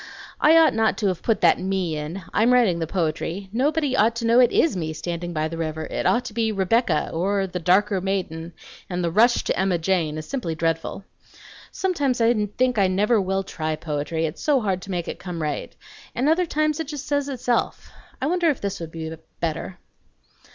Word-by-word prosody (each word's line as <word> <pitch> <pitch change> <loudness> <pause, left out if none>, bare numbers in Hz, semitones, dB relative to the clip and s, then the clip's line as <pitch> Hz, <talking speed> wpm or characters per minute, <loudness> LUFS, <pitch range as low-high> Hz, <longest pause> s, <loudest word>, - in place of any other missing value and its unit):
"I 320 +2 +6
ought 325 -1 +6
not 225 0 +1
to 210 - 0
have 180 -3 -3
put 225 - 0
that - - +5
'me' 185 -4 -1
in. 155 +5 -5
I'm 230 +3 +3
writing 220 -9 +3
the 165 - -2
poetry. 175 +2 -2
Nobody 285 +2 +1
ought 230 -1 +3
to 235 0 -3
know 230 +2 +5
it 245 - +5
IS 325 - +2
me 160 -3 -3
standing 175 +2 -4
by 155 -2 -1
the 165 +1 -6
river; 160 -1 -3
it - - -2
ought 240 +1 +2
to - - -6
be 225 -1 0
'Rebecca,' 195 -3 +1
or 195 +4 0
'the 180 -1 -5
darker 190 +3 +2
maiden;' 175 -4 -3 0.4
and 180 -1 -2
'the 170 - 0
rush 235 +6 +4
to - - 0
Emma 190 -2 +2
Jane' 165 -3 0
is 155 - -6
simply 220 -13 -3
dreadful. 165 +4 -2 0.7
Sometimes 290 -10 0
I 230 -2 +2
think 250 -3 +2
I 195 - +4
never 205 +4 +2
will 195 +1 -1
try 155 -4 -3
poetry, 155 +1 -2
it's 155 +1 -5
so 290 -3 +3
hard 195 -5 -1
to 195 - -11
make 175 -3 -3
it - - -5
come 175 -2 -6
right; 150 -2 -3 0.4
and 255 +4 +1
other 335 +3 +3
times 305 0 0
it 320 - -3
just 295 -1 -6
says 285 -1 -1
itself. 245 -2 -1 0.3
I - - -2
wonder 340 +2 +2
if 285 - 0
this 200 -1 -3
would 165 -2 -7
be 160 0 -6 0.2
better? 165 +2 -3
195 Hz, 210 wpm, -23 LUFS, 165-245 Hz, 0.7 s, I